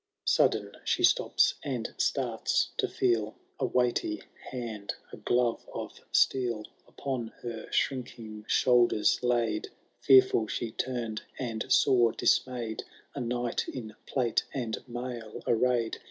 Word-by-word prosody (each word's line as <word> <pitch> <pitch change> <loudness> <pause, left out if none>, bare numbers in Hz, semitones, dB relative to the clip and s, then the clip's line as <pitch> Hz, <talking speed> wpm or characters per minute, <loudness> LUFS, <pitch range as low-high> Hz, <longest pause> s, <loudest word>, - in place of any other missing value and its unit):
Sudden - - +3
ihe - - +3
stops— - - +3
and 125 -5 -3
starts - - +1
to - - +1
feel 115 -4 0 0.2
A 130 - +1
weighty 125 - 0 0.3
hand, 115 -5 -5 0.2
a - - -7
glove 120 -1 +1
of - - -4 0.2
steel. 120 -5 +2 0.2
Upon 130 -4 -4 0.2
her 115 -2 -5
shrinking 115 -5 -2
shoulders 120 -4 +4
laid; 120 -3 +1 0.3
Fetuful 130 -4 +6
she 115 - -3
tumM, 115 -3 -3 0.2
and 115 -4 -4
saw, 120 -4 +5
dismayed, 120 -4 +1 0.3
A - - -5
Knight 120 0 -1
in 110 -4 -6
plate 125 -4 +1
and 120 -4 -1
mail 120 -2 -6
arrayed. 120 -1 +2
120 Hz, 120 wpm, -29 LUFS, 110-125 Hz, 0.3 s, Fetuful